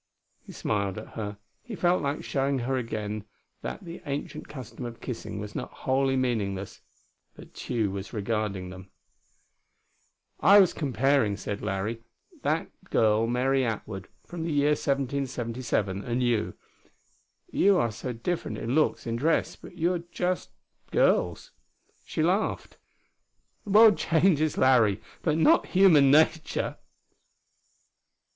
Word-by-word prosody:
He - - -12
smiled 100 -2 -2
at 110 - -8
her; 105 -2 -5 0.2
he - - -8
felt 175 +1 +2
like 140 +1 -2
showing 135 0 0
her 130 +2 -1
again 110 -4 -3 0.4
that - - -6
the 170 0 -8
ancient 140 +1 -4
custom 130 -3 -9
of 120 -1 -7
kissing 115 -4 -6
was 105 0 -7
not - - -5
wholly 135 0 0
meaningless, 105 -7 -2 0.5
but - - -14
Tugh 115 -4 -1
was 95 0 -6
regarding 105 -4 -2
them. 95 0 -11 1.5
"I 200 +6 +7
was 190 -3 +5
comparing," 135 -6 +1
said 100 0 -5
Larry, 105 +4 -3 0.4
"that - - -1 0.2
girl 110 +1 +3
Mary 130 +3 +1
Atwood, 105 -4 -4 0.2
from 175 -1 -7
the 165 0 -2
year 145 0 +3
1777, 130 -8 -1
and 125 +1 -1
you. 120 -3 0 1.0
You 200 -1 +4
are 115 -9 +1
so 115 +4 -5
different 140 +9 -3
in 115 +2 -3
looks, 155 +1 +1
in 115 0 -2
dress, 160 +7 +1
but 180 - -14
you're 175 +2 +1
just 180 +2 -3 0.4
girls." - - +1 0.6
She - - -1
laughed. - - -1 0.9
"The - - -8
world 215 +1 +7
changes, 160 -2 +2
Larry, 115 -6 +4 0.2
but 155 -2 +1
not 160 - +4
human 170 -8 +6
nature." 155 +2 +2
125 Hz, 130 wpm, -27 LUFS, 110-150 Hz, 1.5 s, I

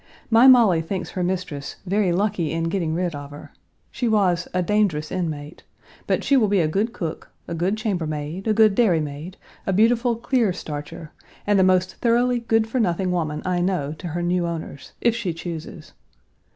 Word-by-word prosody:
My 230 +3 +7
Molly 225 -10 +6
thinks 180 +3 -4
her 180 - -2
mistress 175 -6 -3
"very 195 0 +1
lucky 185 -3 0
in 165 0 -1
getting 165 -3 -1
rid 175 -1 -1
of 145 -1 -7
her." 145 0 -11 0.4
She 245 - -2
was 185 -6 +2
"a 180 0 0
dangerous 175 -6 0
inmate," 155 -4 -4 0.5
but - - 0
she 280 - +3
will 235 -5 +4
be 200 -1 +2
a 160 - +2
good 200 +8 0
cook, 165 -8 -6 0.2
a 170 - -4
good 180 +6 0
chambermaid, 170 -3 -3
a 220 - +3
good 215 -2 +5
dairymaid, 165 -5 0 0.3
a - - +2
beautiful 230 +4 +3
clear 230 -3 +1
starcher, 155 -1 -7 0.3
and 205 -1 +3
the - - +5
most 185 0 +2
thoroughly 240 +1 +2
good 225 -1 +1
for 250 +3 -2
nothing 185 -3 0
woman 155 -4 -2
I 180 -1 0
know 175 -6 -1
to 180 - -6
her 175 +2 -3
new 175 0 0
owners, 160 -4 -7
if 235 -1 +2
she 195 -8 -3
chooses. 165 -2 -8
180 Hz, 185 wpm, -23 LUFS, 165-215 Hz, 0.5 s, My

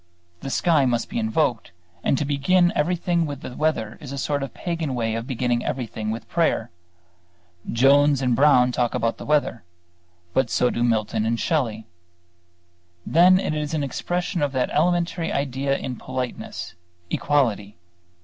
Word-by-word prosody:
The 135 - -6
sky 150 -2 +2
must 120 -2 -1
be 235 - -2
invoked; 155 - 0 0.3
and 135 - +2
to 145 - -1
begin 175 +6 +2
everything 170 +1 +1
with 145 -2 -6
the 125 - -8
weather 120 -9 -1
is 140 - -8
a 140 - -5
sort 145 +1 -1
of 135 -3 -4
pagan 165 -5 -3
way 115 -2 -1
of 115 +2 -4
beginning 125 -2 0
everything 115 -4 -3
with 110 +2 -5
prayer. 160 -9 0 1.0
Jones 140 +3 +4
and 125 -2 +1
Brown 125 -2 +5
talk 120 -1 0
about 115 -2 -1
the - - -8
weather: 145 -7 +1 0.7
but 130 -3 +2
so 125 - +2
do 120 - -1
Milton 110 -2 +1
and 115 +1 0
Shelley. 115 -9 -1 1.2
Then 180 +3 +5
it 175 - -2
is 150 +1 -2
an 150 - -1
expression 175 +5 -2
of 145 -1 0
that 130 -1 0
elementary 170 +1 +1
idea 140 0 -1
in 130 - -5
politeness 130 -7 -5 0.4
equality. 110 -9 0
135 Hz, 160 wpm, -23 LUFS, 120-155 Hz, 1.2 s, Brown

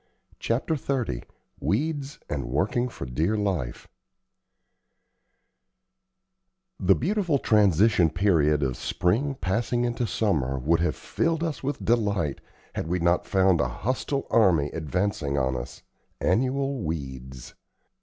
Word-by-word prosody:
CHAPTER 120 +7 0
XXX 130 - -2 0.3
WEEDS 145 +4 -1
AND 70 -4 -3
WORKING 95 - 0
FOR 70 - -7
DEAR 80 - 0
LIFE 90 -12 -2 2.9
The 95 0 +4
beautiful 175 - +1
transition 105 - +4
period 80 -5 +2
of 65 -3 -1
spring 115 +11 0
passing 120 +3 0
into 120 0 -1
summer 75 - 0
would 80 +6 +2
have 85 - 0
filled 165 -1 -1
us 160 -3 -3
with 140 +1 -3
delight 100 - +1 0.3
had - - -3
we 90 +2 0
not 85 0 +1
found 95 -4 +3
a 70 - +1
hostile 130 - -2
army 85 -10 +4
advancing 80 -2 -1
on 65 -1 +1
us - - -7 0.4
annual 135 +1 +1
weeds. 65 -5 -6
95 Hz, 115 wpm, -26 LUFS, 75-120 Hz, 2.9 s, The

